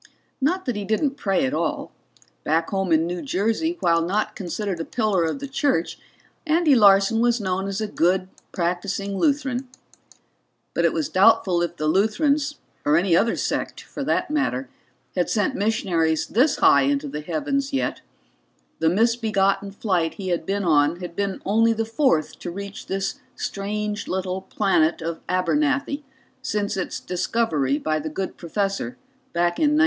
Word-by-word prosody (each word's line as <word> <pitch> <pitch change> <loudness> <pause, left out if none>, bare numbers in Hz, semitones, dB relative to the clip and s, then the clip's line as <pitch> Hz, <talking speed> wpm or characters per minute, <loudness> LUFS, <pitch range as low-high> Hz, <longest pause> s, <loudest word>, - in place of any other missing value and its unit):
Not 360 +8 +1
that 250 -4 -1
he 205 - -3
didn't 220 +7 0
pray 195 - +1
at 130 - -2
all; 155 0 -2 0.5
back 165 +2 0
home 195 -2 -1
in 160 0 +4
New 175 +1 -3
Jersey, 265 - 0
while 165 -1 +3
not 195 +6 -1
considered 190 0 -3
a - - -1
pillar 210 -5 0
of 160 - -2
the 280 0 -6
church, 270 - 0 0.5
Andy 315 -1 +4
Larson 200 -1 +5
was 240 0 +3
known 190 -1 -1
as 195 +1 -3
a - - 0
good, 185 -1 +1 0.2
practicing 190 +3 -2
Lutheran. 275 -2 0 1.1
But - - +1
it - - +4
was 310 - -1
doubtful 190 -3 +4
if 175 0 -2
the 155 - -2
Lutherans, 280 - +2 0.3
or 150 +1 +3
any 175 -1 +3
other 230 +6 +3
sect - - -2
for - - -7
that - - 0
matter, 135 - -1 0.5
had 180 - +1
sent 215 +4 +1
missionaries 185 - +1
this 270 +6 +2
high 140 - +5
into 140 +1 0
the 150 +2 -5
heavens 270 - -2
yet; 270 - -1 0.8
the 160 - +3
misbegotten 205 -1 +1
flight 185 -5 -1
he 190 -2 -5
had 170 -2 -1
been 200 +1 0
on 155 0 +3
had 175 -2 -7
been 200 -1 -2
only 225 +3 +3
the 225 0 -1
fourth 225 - +1
to 175 - -5
reach 200 +3 -7
this 195 0 -2 0.2
strange 210 +1 -3
little 185 0 -2
planet 190 -5 +1
of 165 0 -3
Abernathy 285 - +1 0.4
since 210 -5 -1
its 190 - -3
discovery 175 - 0
by 155 0 -1
the 155 +1 -4
good 190 +5 -4
professor 195 - -2 0.4
back 175 0 +1
in 300 -1 +3
'92. - - +3
195 Hz, 165 wpm, -23 LUFS, 170-230 Hz, 1.1 s, Larson